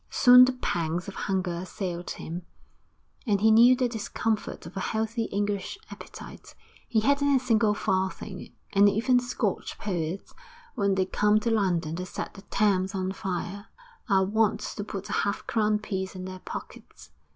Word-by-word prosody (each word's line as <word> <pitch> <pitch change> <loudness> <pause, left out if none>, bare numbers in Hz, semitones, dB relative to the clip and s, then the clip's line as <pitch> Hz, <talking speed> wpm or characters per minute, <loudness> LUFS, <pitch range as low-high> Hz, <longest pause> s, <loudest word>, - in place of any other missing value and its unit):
Soon 250 0 +8
the 255 - 0
pangs 175 -6 -2
of 200 - -6
hunger 190 -3 -1
assailed 175 0 -5
him, 170 +2 -5 0.9
and 205 -2 +2
he 220 +2 +5
knew 235 +3 +7
the 250 -1 +1
discomfort 225 -3 -3
of 165 - -10
a - - -2
healthy 225 +3 -1
English 205 - -2
appetite. - - -11 0.3
He 220 - +2
hadn't 280 +3 +3
a - - +4
single 225 -4 +2
farthing, 190 0 -2 0.2
and 200 +1 +6
even 235 +5 +3
Scotch 245 -4 -2
poets, 180 -2 -4 0.4
when 200 -1 +1
they 190 -1 +2
come 210 +2 +2
to 230 - 0
London 175 -7 +1
to 180 +1 -5
set - - -6
the 195 - -12
Thames 195 -1 +1
on 185 0 -1
fire, 195 +2 -4 0.4
are 190 -1 +4
wont 215 +1 +1
to 205 - -5
put 200 -1 -6
a - - -4
half 200 0 -2
crown 215 -2 +1
piece 190 -3 -4
in 185 0 -6
their 185 0 -7
pockets. - - -10
200 Hz, 165 wpm, -27 LUFS, 185-220 Hz, 0.9 s, Soon